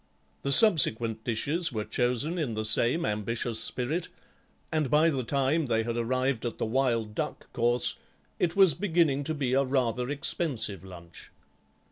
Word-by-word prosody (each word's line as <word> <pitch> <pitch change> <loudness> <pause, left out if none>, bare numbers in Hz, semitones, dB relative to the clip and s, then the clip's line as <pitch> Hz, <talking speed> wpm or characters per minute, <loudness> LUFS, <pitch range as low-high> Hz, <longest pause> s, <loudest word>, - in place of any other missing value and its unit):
The 140 - -2
subsequent 120 - +4
dishes 145 +10 -1
were 110 -3 -4
chosen 125 +8 -1
in 130 -8 -2
the 110 0 -3
same 120 +8 +2
ambitious 110 +2 -2
spirit, 155 +8 -2 0.6
and 155 -4 0
by 155 +4 +3
the 135 -3 -2
time 140 +5 0
they 115 -1 0
had 115 0 -3
arrived 130 +1 -1
at 120 - -4
the - - -2
wild 115 -2 -1
duck - - -5
course 120 +1 +1 0.4
it 170 -1 0
was 190 -5 +5
beginning 160 -6 0
to 160 +2 -2
be 135 -4 -2
a 135 +1 +3
rather 125 -2 -1
expensive 140 - -1
lunch. 85 -3 -12
130 Hz, 155 wpm, -27 LUFS, 115-150 Hz, 0.6 s, was